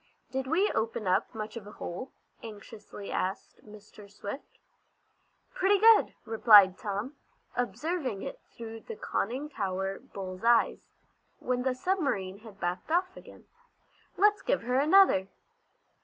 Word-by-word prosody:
"Did 265 0 -3
we 360 +8 +2
open 225 -1 -2
up 185 +1 +1
much 215 0 -6
of 215 -3 -8
a 210 - -11
hole?" 185 +10 -7 0.3
anxiously 210 -2 -10
asked 190 +2 -4
Mr. 210 -1 -14
Swift. 205 +5 -8 1.0
"Pretty 400 +2 +3
good," 445 +2 +5
replied 210 -4 +7
Tom, 210 +8 -4 0.4
observing 255 - -2
it - - -6
through 225 -1 -9
the 455 - -9
conning 260 - -3
tower 195 -6 -3
bull's 185 0 -8
eyes, 235 0 +2 0.5
when 250 0 -2
the 255 0 0
submarine 255 - -1
had 215 -3 -14
backed 175 - -3
off 365 +3 +1
again. - - -14 0.7
"Let's 415 +2 +4
give - - 0
her 250 +2 +1
another." 300 - +5
225 Hz, 130 wpm, -29 LUFS, 200-290 Hz, 1.0 s, replied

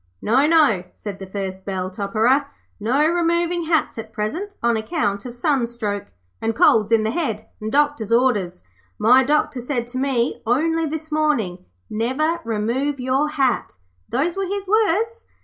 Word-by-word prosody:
'No, 260 - +3
no,' 300 - +4
said 200 -2 -7
the 195 - -7
first 190 -1 -5
bell 185 -1 -3
topperer. 225 +8 +1 0.3
'No 260 +8 +2
removing 340 0 +1
hats 320 -7 0
at 220 0 -8
present 315 - -4
on 235 0 +3
account 220 - -2
of 240 - -8
sunstroke, 235 -6 -1 0.3
and 225 0 -1
colds 215 -1 +4
in 225 -1 +4
the 220 - 0
head, 225 -9 -2
and 215 0 -3
doctor's 290 -6 +1
orders. 210 -8 +1 0.3
My 245 +5 +5
doctor 280 -2 +1
said 245 -1 -2
to 255 +1 -4
me 260 -3 0
only 320 +7 +1
this 315 +1 -5
morning, 290 - 0 0.2
"Never 260 +10 0
remove 235 +6 -1
your 260 +4 +1
hat." 265 - 0 0.3
Those 310 +7 0
were 390 -1 -2
his 400 +1 -4
words. 440 +2 +1
255 Hz, 155 wpm, -21 LUFS, 215-310 Hz, 0.3 s, My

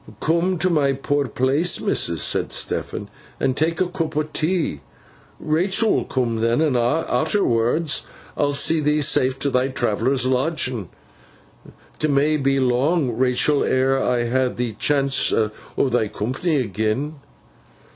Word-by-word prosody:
'Come 170 +3 +1
to 180 +3 +1
my 140 -4 +2
poor 140 +1 -1
place, 135 +9 +1
missus,' - - 0
said - - +1
Stephen, - - -2 0.3
'and 130 - 0
tak 160 +3 0
a - - +3
coop 165 -4 -4
o' 155 - +2
tea. 155 - -2 0.6
Rachael 190 +8 +1
will - - 0
coom 120 -3 -1
then; 115 +3 +1
and 155 -5 +1
arterwards 125 - +1 0.3
I'll 145 -1 0
see 160 +3 +2
thee 150 0 +1
safe 130 -1 +2
t' 140 +1 -1
thy 125 +1 +1
Travellers' 125 0 0
lodgin. 130 - -1 1.1
'T 155 - +1
may 145 +2 +2
be 135 -1 +1
long, 130 +3 +1
Rachael, 130 +4 +2
ere 130 +1 +2
ever 135 - 0
I 120 -1 0
ha 130 +1 +1
th' 120 -3 -4
chance 140 -1 +2
o' 110 -1 +1 0.4
thy 120 -3 +1
coompany 130 - -1
agen. 110 +8 -2
135 Hz, 145 wpm, -21 LUFS, 125-155 Hz, 1.1 s, a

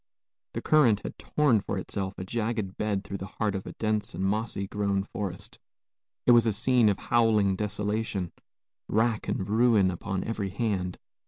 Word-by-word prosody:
The - - -4
current 125 -10 +4
had - - -7
torn 140 -8 +2
for 100 - -3
itself 95 +1 -4
a - - -4
jagged 110 -1 -2
bed 105 -2 -1
through 100 0 -6
the 95 - -5
heart 105 -3 +1
of 95 -1 -5
a - - -6
dense 110 0 -1
and - - -3
moss 105 +4 -1
grown 100 -1 0
forest. 100 -3 -6 0.7
It - - +6
was 120 -1 +6
a 110 - +2
scene 120 +1 +3
of 100 - +1
howling 110 -5 +3
desolation, 105 -2 -2 0.6
rack 110 +1 +1
and 95 - -2
ruin 110 -3 +4
upon 95 +2 -3
every 105 -3 -3
hand. 95 -4 -2
105 Hz, 170 wpm, -28 LUFS, 95-115 Hz, 0.7 s, It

